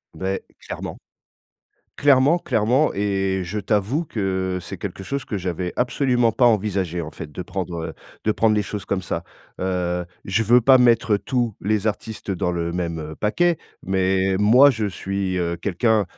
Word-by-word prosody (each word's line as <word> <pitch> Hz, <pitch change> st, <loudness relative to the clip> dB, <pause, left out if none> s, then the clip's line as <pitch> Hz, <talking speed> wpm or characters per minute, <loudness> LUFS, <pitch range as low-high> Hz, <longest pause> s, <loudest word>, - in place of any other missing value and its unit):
Beh, 95 Hz, +1 st, -2 dB, 0.2 s
clairement. -, -, -6 dB, 1.0 s
Clairement, 140 Hz, +3 st, +4 dB
clairement 125 Hz, +1 st, +2 dB
et 95 Hz, -1 st, 0 dB
je 90 Hz, +5 st, -4 dB
t'avoue 110 Hz, -, 0 dB
que, 95 Hz, -6 st, -2 dB
c'est 85 Hz, -, -7 dB
quelque -, -, -6 dB
chose 140 Hz, +7 st, -3 dB
que 105 Hz, -, -3 dB
j'avais 90 Hz, -1 st, -3 dB
absolument 125 Hz, -2 st, +2 dB
pas 125 Hz, +3 st, +1 dB
envisagé 100 Hz, -6 st, +1 dB
en 80 Hz, -2 st, -5 dB
fait 75 Hz, 0 st, -9 dB
de 75 Hz, -, -6 dB
prendre, 90 Hz, -1 st, -4 dB
heu, -, -, -7 dB, 0.3 s
de 110 Hz, -, +3 dB
prendre 110 Hz, 0 st, +3 dB
les 105 Hz, -, +2 dB
choses 100 Hz, 0 st, -5 dB
comme 100 Hz, -, -1 dB
ça. 90 Hz, -, -4 dB, 0.4 s
Heu, 90 Hz, -1 st, -1 dB, 0.2 s
je 100 Hz, +4 st, +1 dB
veux 120 Hz, +3 st, +5 dB
pas 130 Hz, +3 st, +7 dB
mettre 120 Hz, -3 st, +4 dB
tous 120 Hz, +1 st, -1 dB
les 105 Hz, +1 st, 0 dB
artistes 110 Hz, -1 st, -3 dB
dans 90 Hz, -1 st, -1 dB
le 85 Hz, -1 st, -2 dB
même 80 Hz, -3 st, -3 dB
paquet, 170 Hz, +11 st, +2 dB, 0.3 s
mais 95 Hz, 0 st, +1 dB
moi 120 Hz, +8 st, +7 dB
je 115 Hz, -5 st, -2 dB
suis, 95 Hz, -1 st, -2 dB
heu, 85 Hz, -1 st, -1 dB
quelqu'un, 105 Hz, +4 st, +1 dB
100 Hz, 165 wpm, -22 LUFS, 90-115 Hz, 1.0 s, pas